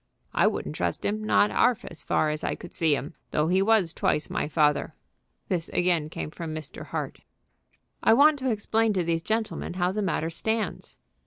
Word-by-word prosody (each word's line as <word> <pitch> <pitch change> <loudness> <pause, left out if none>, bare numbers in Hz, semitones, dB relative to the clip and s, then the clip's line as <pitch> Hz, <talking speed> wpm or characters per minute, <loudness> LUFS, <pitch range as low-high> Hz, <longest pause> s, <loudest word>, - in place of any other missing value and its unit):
"I - - +4
wouldn't 75 - -2
trust 85 -1 -2
him, 215 +1 -1
not 210 -1 +3
'alf 245 -1 +2
as 165 - -7
far 155 - +1
as 150 - -4
I - - -1
could 175 - -11
see 160 -3 +2
him, 140 +1 -5 0.2
though 150 +2 +1
he 185 +2 +3
was 200 -5 +3
twice 150 - 0
my - - -1
father." 150 -2 +1 0.5
This 170 -3 -1
again 175 -4 +1
came 155 - -5
from 160 -2 -6
Mr. 155 -2 -6
Hart. - - -4 0.8
"I 225 - +5
want 290 +2 +5
to 260 0 -1
explain 220 0 +1
to 185 -3 +1
these 165 0 0
gentlemen 220 -2 -2
how 180 0 +1
the 210 +2 -2
matter 165 -4 -1
stands." 220 +6 -3
175 Hz, 190 wpm, -26 LUFS, 155-215 Hz, 0.8 s, I